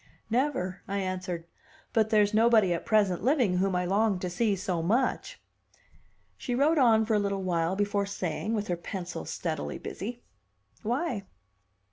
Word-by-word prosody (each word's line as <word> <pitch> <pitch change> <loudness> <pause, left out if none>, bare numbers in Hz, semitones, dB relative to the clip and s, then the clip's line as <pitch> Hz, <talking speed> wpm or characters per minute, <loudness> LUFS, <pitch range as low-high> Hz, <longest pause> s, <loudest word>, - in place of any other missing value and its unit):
"Never," 230 -8 0
I 200 - -2
answered, 185 -3 -3 0.5
"but 220 -2 +3
there's 210 -1 +3
nobody 220 -4 +5
at 170 - -5
present 205 -5 +3
living 245 -8 +2
whom 190 0 +1
I 180 0 0
long 200 +2 +2
to 180 - -3
see 205 +3 +1
so 185 -2 -2
much." 250 - 0 1.0
She 245 - -2
wrote 300 +5 +3
on 225 -4 +5
for 225 - 0
a 210 - +4
little 200 -1 -1
while 170 0 0
before 205 0 0
saying, 200 +3 -2
with 210 -1 -2
her 175 - -1
pencil 180 0 -6
steadily 160 -4 -3
busy, 235 +4 -6 0.6
"Why?" 240 - -2
200 Hz, 155 wpm, -28 LUFS, 180-225 Hz, 1.0 s, nobody